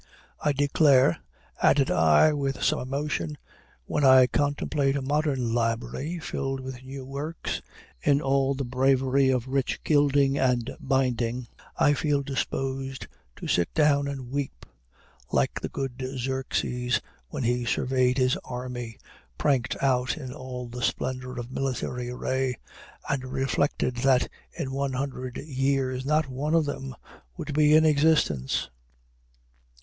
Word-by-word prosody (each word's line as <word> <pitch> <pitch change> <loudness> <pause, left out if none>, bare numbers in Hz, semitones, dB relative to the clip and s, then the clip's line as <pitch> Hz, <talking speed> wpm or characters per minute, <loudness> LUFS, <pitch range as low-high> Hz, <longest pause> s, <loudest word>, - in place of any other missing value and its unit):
I 150 - +1
declare," 140 - +4 0.4
added 140 -2 +4
I, 80 - +5
with 140 -2 -2
some - - +2
emotion, 150 +3 -3 0.5
"when 150 - -1
I 130 -1 +8
contemplate 145 +1 0
a 140 - -1
modern 135 -4 0
library, 120 +8 -1
filled 135 -4 -3
with 130 -1 -7
new 135 0 -8
works, 145 +5 -4 0.4
in 140 0 +3
all 135 -1 +1
the 135 0 -3
bravery 130 +1 +2
of 130 -1 0
rich 135 0 -1
gilding 145 -2 +3
and 125 -2 +1
binding, 125 -2 0 0.3
I 145 - +4
feel 145 -1 0
disposed 135 -1 -3 0.3
to - - -7
sit 85 -1 +1
down 145 -2 +3
and 135 -3 -6
weep; 140 - -4 0.7
like - - +1
the - - -3
good 135 -1 -4
Xerxes, 125 -1 -1 0.3
when 125 - -4
he 120 +1 +1
surveyed 130 +2 +1
his 130 -1 +2
army, 125 -2 -6 0.4
pranked 135 -3 +1
out 130 +2 +2
in 130 -4 -7
all 125 -3 -6
the 125 +1 -7
splendor 130 +1 -2
of 120 +1 -7
military 125 -2 -3
array, 130 +1 -1 0.5
and 140 -2 -1
reflected 130 0 -1
that 130 0 +3 0.2
in 135 - -4
one 135 0 -1
hundred 130 -1 -4
years 135 -2 -1
not 155 0 +2
one 140 +5 -1
of 165 -2 +3
them 135 -2 -5 0.4
would 150 - -5
be 150 +1 +5
in 160 0 +6
existence!" 145 - +2
135 Hz, 135 wpm, -26 LUFS, 125-140 Hz, 0.7 s, I